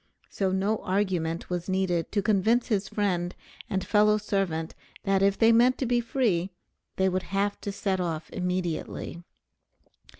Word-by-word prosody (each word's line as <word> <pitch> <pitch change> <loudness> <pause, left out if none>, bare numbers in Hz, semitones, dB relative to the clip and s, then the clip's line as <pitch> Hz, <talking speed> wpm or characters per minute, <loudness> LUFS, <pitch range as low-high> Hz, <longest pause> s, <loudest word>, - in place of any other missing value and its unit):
So 190 -2 0
no 195 +3 +1
argument 185 -4 -1
was 175 +1 -3
needed 185 -3 0
to 205 -1 +1
convince 220 +4 +2
his 200 -3 +1
friend 180 -4 -1 0.3
and 190 -1 -1
fellow 210 0 +4
servant 195 -6 -1 0.3
that 195 -2 +2
if 200 0 +3
they 225 0 +5
meant 240 +3 +5
to 265 - -1
be 240 0 +2
free 225 -8 0 0.5
they 190 - +2
would 185 0 0
have 200 +2 -1
to 200 - -3
set 195 -1 -1
off 165 -3 -2
immediately. 180 -2 -3
195 Hz, 155 wpm, -27 LUFS, 180-210 Hz, 0.5 s, they